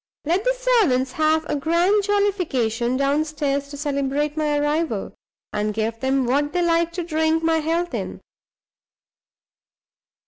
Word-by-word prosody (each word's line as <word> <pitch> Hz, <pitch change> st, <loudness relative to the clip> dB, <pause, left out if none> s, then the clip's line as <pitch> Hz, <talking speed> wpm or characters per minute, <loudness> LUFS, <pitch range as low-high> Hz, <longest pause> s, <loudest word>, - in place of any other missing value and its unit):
Let 350 Hz, +6 st, +1 dB
the -, -, +1 dB
servants 420 Hz, -, +2 dB
have 315 Hz, +2 st, +1 dB
a 300 Hz, -, -2 dB
grand 345 Hz, +8 st, +2 dB
jollification 285 Hz, -, 0 dB
downstairs 285 Hz, 0 st, 0 dB
to 285 Hz, 0 st, -9 dB
celebrate 285 Hz, 0 st, -1 dB
my 300 Hz, -2 st, 0 dB
arrival, 295 Hz, -6 st, -1 dB, 0.4 s
and 210 Hz, 0 st, -1 dB
give 225 Hz, +1 st, -2 dB
them 265 Hz, 0 st, +1 dB
what 290 Hz, +4 st, 0 dB
they 355 Hz, -1 st, +1 dB
like 335 Hz, 0 st, +2 dB
to 350 Hz, 0 st, -3 dB
drink 320 Hz, 0 st, 0 dB
my 325 Hz, 0 st, +2 dB
health 335 Hz, +3 st, -1 dB
in. -, -, -4 dB
300 Hz, 135 wpm, -22 LUFS, 275-335 Hz, 0.4 s, servants